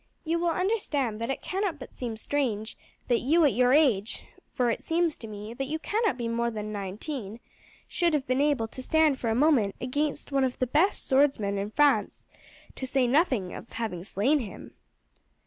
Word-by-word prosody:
"You 335 0 0
will 345 0 +1
understand 325 - -1
that 230 - -2
it 270 - -3
cannot 380 -4 -2
but 260 - -11
seem 235 -3 -5
strange 225 -4 -1 0.3
that 240 -2 +3
you 320 +5 +3
at 285 - +3
your 250 0 +3
age 250 -8 +3 0.3
for 245 -2 +1
it - - -3
seems 330 -1 0
to 225 - -9
me 210 +1 -7
that 270 +2 -4
you 310 +3 -2
cannot 420 - 0
be 235 -2 -3
more 235 +1 0
than 215 -2 -5
nineteen 210 +3 -5 0.5
should 340 -3 +1
have 275 -3 -1
been 255 +2 +1
able 285 -6 +1
to 260 - -8
stand 310 0 +3
for 230 - -1
a 220 - +1
moment 250 -7 +3
against 285 +4 -2
one 275 -1 +2
of 255 -1 -1
the 255 - +1
best 310 +11 +1
swordsmen 260 -8 +2
in 200 +1 -3
France, 290 +5 +2 0.5
to 260 - -3
say 260 0 +2
nothing 250 - +1
of - - -10
having 215 -7 -4
slain 220 +10 +1
him." 225 -7 -8
260 Hz, 195 wpm, -27 LUFS, 225-300 Hz, 0.5 s, that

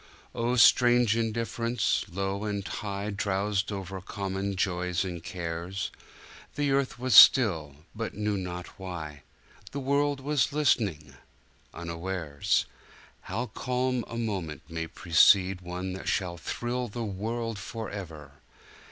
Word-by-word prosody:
Oh, 120 +1 0
strange 120 -1 +6
indifference! 115 0 0
low 95 +2 -2
and 100 -2 -3
high 100 -1 -4
Drowsed 100 0 -1
over 95 -1 -5
common 95 +1 -3
joys 90 -1 0
and 90 -2 -5
cares; 90 +1 -4 0.6
The 145 -1 +1
earth 135 -2 +1
was 130 +1 -1
still 85 - +7
— - - -33
but 115 -1 -4
knew 105 0 -1
not 90 -2 -4
why, 80 -6 -6 0.5
The 140 - -5
world 140 +1 +1
was 145 +1 +1
listening 100 - +1 0.3
— - - -34
unawares. 85 -3 -1 0.6
How 120 - -1
calm 125 0 -1
a 115 - -6
moment 95 - -3
may 80 0 -4
precede 90 +3 +4
One 90 +1 -4
that 95 - -7
shall 90 -3 0
thrill 120 +7 -3
the 115 +2 -4
world 110 +2 -3
forever! 95 - -7
100 Hz, 125 wpm, -28 LUFS, 90-115 Hz, 0.6 s, still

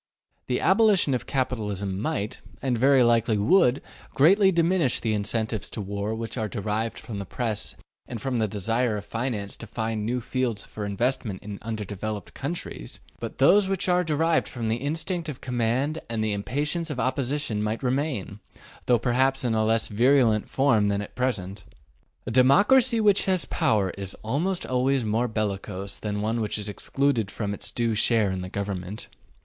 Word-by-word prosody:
The 125 - 0
abolition 195 -7 +4
of 120 -1 -2
capitalism 105 -7 -2
might, 120 -5 -3 0.2
and 130 -3 0
very 135 +2 +5
likely 115 -2 +3
would, 135 - +3 0.3
greatly 190 +7 +5
diminish 170 -5 +2
the 110 -2 -1
incentives 110 +1 -2
to - - -5
war 100 +2 -3
which 115 +1 -5
are 110 - -1
derived 110 +1 -2
from 105 -4 -6
the 100 - -5
Press 110 -1 -3 0.3
and 120 - -5
from 130 0 -2
the 110 - +2
desire 110 +3 0
of 100 - -7
finance 115 -3 -3
to 115 - -9
find 110 -1 -3
new 120 +4 -1
fields 120 -3 -2
for 105 - -6
investment 110 -2 -1
in 105 -1 -7
undeveloped 105 -2 -5
countries, - - -6 0.2
but - - -6
those 190 +9 +5
which 195 -1 -1
are 180 0 +3
derived 160 0 +1
from 115 -3 -4
the 110 - +1
instinct 160 +5 -2
of 140 - -6
command 125 +5 0
and 115 -1 -1
the 110 -1 0
impatience 145 - -2
of 140 -4 -4
opposition 130 -2 -1
might 110 +4 -2
remain, 125 -6 -1 0.5
though 125 - +5
perhaps 130 +3 +2
in 120 - +1
a 110 0 +2
less 110 +1 +2
virulent 115 -1 +3
form 120 -7 +3
than 100 0 0
at - - -11
present. 100 -7 -2 0.6
A - - -3
democracy 210 - +5
which 205 -2 +4
has 185 -3 +1
power 100 -4 +1
is 95 -1 -4
almost 165 - -1
always 130 0 +1
more 115 +3 +1
bellicose 100 -2 -3
than 105 -1 -3
one 115 +2 0
which 105 - -2
is 105 -1 -4
excluded 120 +1 0
from 100 -2 -3
its - - -5
due 115 -1 0
share 110 -2 +2
in 95 -1 -3
the 90 - -6
government. 100 0 -5
115 Hz, 175 wpm, -26 LUFS, 105-135 Hz, 0.6 s, very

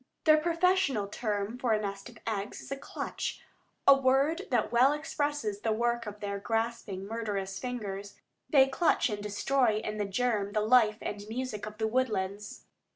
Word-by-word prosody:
Their 310 0 +7
professional 335 - +2
term 210 +1 -3
for 240 -3 +2
a 215 - +2
nest 200 -1 -5
of - - -15
eggs 210 -1 -3
is - - -11
"a - - 0
clutch," 275 - -5 0.5
a 275 - +10
word 275 +7 +2
that 240 -4 +1
well 255 +4 +5
expresses 290 -8 -2
the 225 - -1
work 235 +1 0
of 210 0 -8
their 200 -1 -3
grasping, 225 -3 -2
murderous 200 -3 -3
fingers. 205 -5 -5 0.3
They 270 -3 +6
clutch 270 0 +2
and 205 -1 -3
destroy 220 +3 +1
in 215 0 -4
the 205 - 0
germ 205 -1 0
the 215 - +2
life 215 -1 +4
and 205 - -4
music 230 -3 -4
of 215 0 -9
the 220 0 0
woodlands. 210 -4 -2
225 Hz, 170 wpm, -30 LUFS, 205-260 Hz, 0.5 s, a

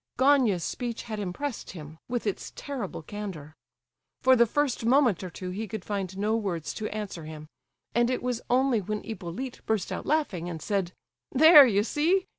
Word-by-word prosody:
Gania's 255 - +4
speech 240 -2 -4
had 215 -3 -5
impressed 210 +7 -4
him, 155 -2 -10
with 245 -2 -2
its 205 - -3
terrible 250 - -5
candour. 180 -6 -7 0.7
For 260 0 +6
the 235 -1 +5
first 290 -1 0
moment 240 - +3
or 185 - -5
two 180 +1 -6
he 215 +4 -4
could 210 -3 -6
find 195 -2 -3
no 210 +2 +1
words 185 -8 -2
to 215 -1 -4
answer 205 -6 -5
him, 155 -1 -9 0.5
and 240 0 +3
it 255 - -1
was 250 -2 -1
only 250 -2 +3
when 210 +2 -4
Hippolyte 220 +4 -6
burst 220 -3 0
out - - -4
laughing, 210 - 0
and 165 -2 -5
said: 195 -1 -1 0.4
"There, 300 0 +9
you 205 -3 +2
see! 335 - +1
215 Hz, 180 wpm, -27 LUFS, 185-255 Hz, 0.7 s, There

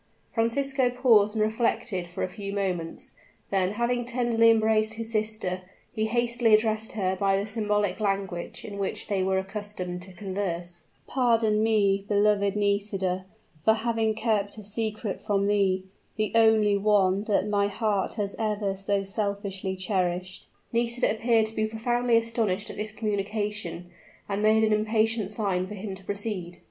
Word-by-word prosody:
Francisco 260 +3 +1
paused 230 -4 +4
and 215 - +2
reflected 215 -4 0
for 175 - -5
a - - 0
few 200 +1 -6
moments; 185 -5 -3 0.4
then, 190 0 +1
having 240 +2 0
tenderly 235 -2 +3
embraced 220 -1 +3
his 225 0 -5
sister, 215 -4 -1 0.3
he 220 -1 0
hastily 235 -1 +3
addressed 220 0 0
her 190 -3 0
by 195 0 +2
the 200 - -1
symbolic 210 -2 0
language 195 -4 -2
in 200 -2 -7
which 195 - -2
they 200 -2 0
were 190 0 +1
accustomed 190 -2 -4
to 190 +1 -10
converse: 175 -3 -4 0.2
"Pardon 230 -4 +2
me, 200 -3 +2
beloved 205 -1 +2
Nisida, 200 -2 0 0.4
for 220 - +5
having 225 -1 0
kept 210 -2 0
a 215 - -8
secret 215 0 -3
from 200 -1 +1
thee 195 -2 +2 0.3
the 215 -1 -1
only 220 -2 +5
one 200 -1 +2
that 210 -1 +1
my 200 -1 +2
heart 205 -1 -1
has 205 -3 -3
ever 210 -3 -1
so 195 +1 -1
selfishly 200 -1 -3
cherished." 185 -1 -2 0.3
Nisida 235 0 +1
appeared 225 0 +2
to 220 - -5
be 215 0 +1
profoundly 240 +2 +1
astonished 225 -4 -1
at - - -9
this 215 +1 -4
communication, 205 -4 -3 0.4
and 200 0 -2
made 215 +1 +4
an 215 -1 +3
impatient 215 0 +1
sign 195 -4 -1
for 210 - -7
him 200 0 -5
to 190 0 -11
proceed. 200 -3 -4
210 Hz, 155 wpm, -27 LUFS, 195-220 Hz, 0.4 s, for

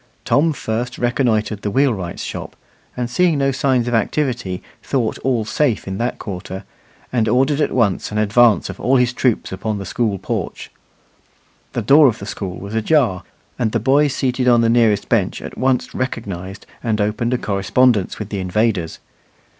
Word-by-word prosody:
Tom 160 +3 +3
first 120 -3 -3
reconnoitred 115 -4 0
the 105 - -2
wheelwright's 105 -8 0
shop; - - -6 0.4
and 125 -1 -1
seeing 165 +5 +2
no 135 0 +2
signs 130 -3 +1
of 120 - -1
activity, 115 -5 -1 0.2
thought 125 -5 -1
all 125 -4 0
safe 115 0 0
in 95 0 -4
that 120 +1 -1
quarter, 95 -1 -6 0.5
and 115 -3 +2
ordered 135 +5 +2
at - - +1
once 110 -7 +1
an 105 - -3
advance 110 +1 +4
of - - -8
all 130 - +2
his 125 -1 +3
troops 125 -3 0
upon 100 +3 -3
the 100 - -6
schoolporch. 100 +1 -3 1.0
The - - -2
door 145 +1 +7
of 115 - 0
the 100 - -8
school 95 -3 -5
was 100 +2 -8
ajar, 110 - +2 0.4
and 110 -3 0
the 115 - +2
boys 140 +5 +3
seated 125 -1 0
on 120 -1 +5
the 115 - +3
nearest 115 -4 +3
bench - - +1
at - - -8
once 130 -1 0
recognized 100 -7 -5 0.2
and 110 -3 -1
opened 110 +4 0
a - - 0
correspondence 105 +1 +1
with 105 -1 -6
the 100 - -3
invaders. 95 -2 0
115 Hz, 170 wpm, -19 LUFS, 105-130 Hz, 1.0 s, door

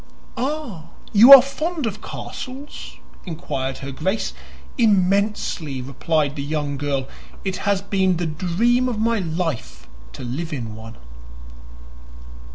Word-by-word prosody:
"Ah, 260 - -3 0.3
you 225 +6 +8
are 270 -3 +13
fond 310 +2 -3
of 215 -1 -4
castles?" 270 +3 -8 0.3
inquired 135 -6 -4
her 140 - -5
Grace. 190 +10 -2 0.4
"Immensely!" 200 - +1
replied 140 +3 -1
the 140 - -4
young 145 0 -2
girl. 140 -2 -2 0.4
"It 190 -1 -2
has 195 -1 +1
been 190 -3 +1
the 175 - -2
dream 195 +11 +1
of 235 - -3
my 225 +1 +1
life 165 - -4 0.3
to - - -8
live 155 +7 -4
in 115 -6 -4
one." 110 +1 -10
180 Hz, 125 wpm, -22 LUFS, 145-225 Hz, 0.4 s, are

